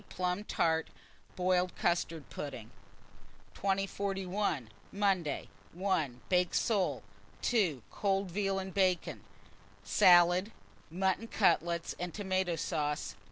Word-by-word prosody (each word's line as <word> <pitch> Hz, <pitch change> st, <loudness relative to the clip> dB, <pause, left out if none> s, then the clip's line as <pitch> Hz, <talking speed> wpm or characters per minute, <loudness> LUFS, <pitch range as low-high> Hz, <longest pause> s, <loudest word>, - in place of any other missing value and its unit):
Plum 180 Hz, +2 st, -2 dB
tart, 160 Hz, -4 st, +1 dB, 0.5 s
boiled 180 Hz, 0 st, +1 dB
custard 165 Hz, -3 st, -1 dB
pudding. 125 Hz, -6 st, -6 dB, 0.8 s
2051. 195 Hz, -, -1 dB, 0.2 s
Monday. 195 Hz, -7 st, 0 dB, 0.3 s
1. 160 Hz, -9 st, -1 dB
Baked 180 Hz, -1 st, +2 dB
soles. 200 Hz, -5 st, +1 dB, 0.4 s
2. 180 Hz, -, +1 dB
Cold 195 Hz, -2 st, 0 dB
veal 195 Hz, +1 st, 0 dB
and 190 Hz, -1 st, -4 dB
bacon, 185 Hz, -3 st, +1 dB, 0.6 s
salad, 180 Hz, +1 st, +5 dB, 0.4 s
mutton 190 Hz, +6 st, 0 dB
cutlets 170 Hz, -5 st, +1 dB
and 180 Hz, -1 st, -4 dB
tomato 190 Hz, -4 st, 0 dB
sauce. 150 Hz, -2 st, -2 dB
180 Hz, 95 wpm, -32 LUFS, 170-195 Hz, 0.8 s, salad